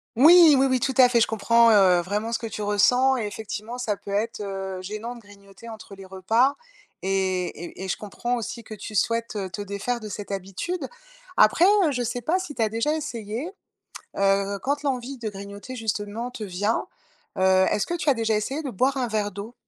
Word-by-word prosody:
Oui, 320 +4 +8
oui, 270 - +4
oui, 255 -1 +2
tout 265 +2 -1
à 250 -1 +8
fait. 240 - +3
Je 230 - +5
comprends, 230 +2 +4
heu, 185 -4 +5
vraiment, 210 +5 -3
ce 230 - +1
que 230 - -7
tu 215 -1 -5
ressens. 250 +6 +3
Et 225 - -2
effectivement, 215 +3 -6
ça 210 -4 -1
peut 200 - -9
être, 220 +2 -1
heu, 195 -2 -5
gênant 215 +5 -6
de - - -11
grignoter 200 +2 -15
entre 215 -3 -10
les 195 0 -11
repas 220 +9 +1 0.5
et 190 -2 0 0.2
et 180 +2 -8
et - - -4
je - - -2
comprends 240 +4 -3
aussi 235 0 -5
que 220 - -9
tu 215 +1 -9
souhaites, 230 +2 0
heu, 195 -2 -3
te 205 - -6
défaire 205 +5 -3
de 215 -1 -8
cette 205 0 -7
habitude. 195 - -4 0.5
Après, 215 +12 +5
heu, 395 -6 +4
je 250 -3 -1
sais 245 +1 -3
pas 330 +9 +1
si 370 -6 -5
tu 235 - -4
as 220 - +2
déjà 230 +8 0
essayé, 240 - -5 0.7
heu, 195 0 +1
quand 285 +2 -1
l'envie 265 -1 -2
de 225 -3 -4
grignoter, 200 +5 -9
justement, 220 +1 -3
te 225 -3 -8
vient, 205 +3 -1 0.5
heu, 190 0 +4
est-ce 205 - 0
que 345 - -2
tu 320 - -5
as - - +6
déjà 225 -2 0
essayé 265 +9 -2
de 280 - -4
boire 260 +5 0
un 250 -2 0
verre 210 -2 -1
d'eau? 205 +5 -8
220 Hz, 215 wpm, -24 LUFS, 200-245 Hz, 0.7 s, Oui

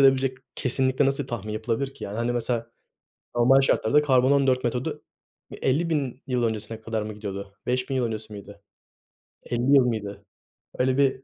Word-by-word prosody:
edebilecek 135 -1 +4 0.2
kesinlikle 130 +2 +2
nasıl 135 0 0
tahmin 110 -3 -5
yapılabilir 115 +5 -2
ki? - - -8
Yani, 100 +2 -5
hani, 120 +1 0
mesela, 115 -1 -2 0.7
normal 125 +3 +6
şartlarda 140 +2 +3
Karbon-14 130 -1 +3
metodu 125 +2 -2 0.5
bir - - -9
50.000 140 -3 0
yıl 125 -2 0
öncesine 110 0 -3
kadar 110 -1 -2
mı 105 0 -5
gidiyordu? 100 -1 -6
5.000 125 +2 -1
yıl 130 -2 +1
öncesi 110 -1 -4
miydi? 100 0 -10 0.8
50 125 +4 +3
yıl 130 - +6
mıydı? 105 -4 -3 0.6
Öyle 130 +1 +2
bir 135 -1 +2
125 Hz, 155 wpm, -25 LUFS, 110-135 Hz, 0.8 s, normal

